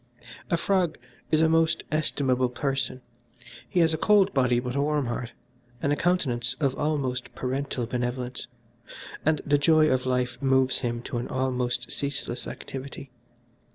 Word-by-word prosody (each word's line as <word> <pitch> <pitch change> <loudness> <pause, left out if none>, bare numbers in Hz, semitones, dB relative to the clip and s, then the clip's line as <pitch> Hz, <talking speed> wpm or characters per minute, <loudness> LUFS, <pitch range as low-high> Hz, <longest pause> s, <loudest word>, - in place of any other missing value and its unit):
"A 170 - +2
frog 180 -3 +1 0.3
is 155 0 +3
a 160 - +5
most 165 0 +2
estimable 135 -4 +1
person. 135 0 -2 0.7
He 180 - +2
has 160 -1 +4
a 160 - -2
cold 205 0 +4
body 125 -2 +3
but 125 +1 -4
a 140 - +2
warm 150 -1 +1
heart, 120 0 -4 0.5
and 140 +4 +1
a - - +2
countenance 140 -9 0
of 140 -4 +1
almost 135 -4 -2
parental 130 -1 -2
benevolence, 125 +1 -3 0.8
and 155 -1 +2
the 145 0 +3
joy 155 +1 +5
of 130 0 +1
life 125 0 -1
moves 130 -1 +3
him 120 -1 -2
to 120 - -3
an 120 - -4
almost 125 -2 -1
ceaseless 140 -3 -3
activity. 135 0 -7
135 Hz, 155 wpm, -27 LUFS, 125-155 Hz, 0.8 s, a